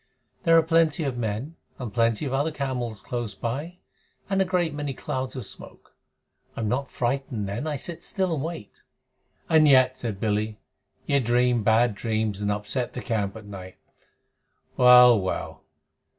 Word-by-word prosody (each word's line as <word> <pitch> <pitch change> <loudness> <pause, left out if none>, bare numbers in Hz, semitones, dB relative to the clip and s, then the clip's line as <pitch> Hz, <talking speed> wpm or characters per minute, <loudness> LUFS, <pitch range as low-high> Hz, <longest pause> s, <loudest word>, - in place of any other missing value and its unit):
"There 165 -1 +6
are 165 - +5
plenty 165 0 +2
of 135 -4 -2
men 120 +7 -4 0.2
and 120 -5 -6
plenty 115 +3 +1
of 135 - -3
other 140 +4 +1
camels 125 -7 -4
close 120 -5 -4
by, 145 - -4 0.5
and 195 0 +2
a - - +3
great 180 -4 0
many 145 -2 -4
clouds 130 0 -4
of 125 -5 -5
smoke. - - -11 0.6
I - - -4
am 110 - -1
not 125 +5 -1
frightened 125 -4 -2
then. 100 +10 -4
I 150 - -1
sit 165 +4 -6
still 190 -3 -1
and 145 -3 -2
wait." 160 -10 -7 0.7
"And 160 -2 +5
yet," 130 -2 +5
said 110 -6 -4
Billy, 105 0 -1 0.5
"you 140 - +2
dream 120 0 +2
bad 110 +2 +3
dreams 110 -1 -2
and 105 0 0
upset 105 +4 -3
the 125 - -5
camp 105 -4 -2
at 110 -1 -10
night. 95 -2 -10 1.0
Well, 125 -2 +8
well! 95 -1 -4
125 Hz, 165 wpm, -25 LUFS, 110-145 Hz, 1.0 s, Well